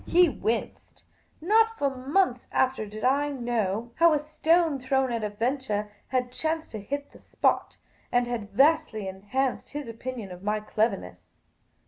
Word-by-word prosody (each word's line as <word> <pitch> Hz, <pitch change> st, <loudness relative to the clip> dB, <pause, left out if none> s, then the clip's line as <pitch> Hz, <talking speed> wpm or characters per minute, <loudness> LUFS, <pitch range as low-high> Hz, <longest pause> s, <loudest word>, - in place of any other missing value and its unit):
He 355 Hz, +1 st, +6 dB
winced. 230 Hz, -4 st, -3 dB, 0.4 s
Not 445 Hz, +6 st, +3 dB
for 275 Hz, -2 st, 0 dB
months 260 Hz, 0 st, +1 dB
after 260 Hz, -4 st, +1 dB
did 215 Hz, +1 st, -8 dB
I 280 Hz, +3 st, +3 dB
know 235 Hz, -4 st, -2 dB
how 335 Hz, -1 st, +6 dB
a -, -, +4 dB
stone 310 Hz, +1 st, +2 dB
thrown 260 Hz, 0 st, +1 dB
at 230 Hz, -2 st, -2 dB
a 210 Hz, -, 0 dB
venture 215 Hz, -2 st, -2 dB, 0.2 s
had 250 Hz, -1 st, -1 dB
chanced 320 Hz, +4 st, -2 dB
to 215 Hz, -, -6 dB
hit 285 Hz, +7 st, -4 dB
the -, -, -16 dB
spot, -, -, 0 dB, 0.3 s
and 245 Hz, 0 st, +3 dB
had 235 Hz, -4 st, -4 dB
vastly 270 Hz, -3 st, +3 dB
enhanced 205 Hz, +11 st, -2 dB
his 290 Hz, -2 st, -4 dB
opinion 230 Hz, -3 st, -6 dB
of 180 Hz, 0 st, -9 dB
my 210 Hz, +2 st, 0 dB
cleverness. 195 Hz, -, -2 dB
255 Hz, 155 wpm, -27 LUFS, 215-290 Hz, 0.4 s, He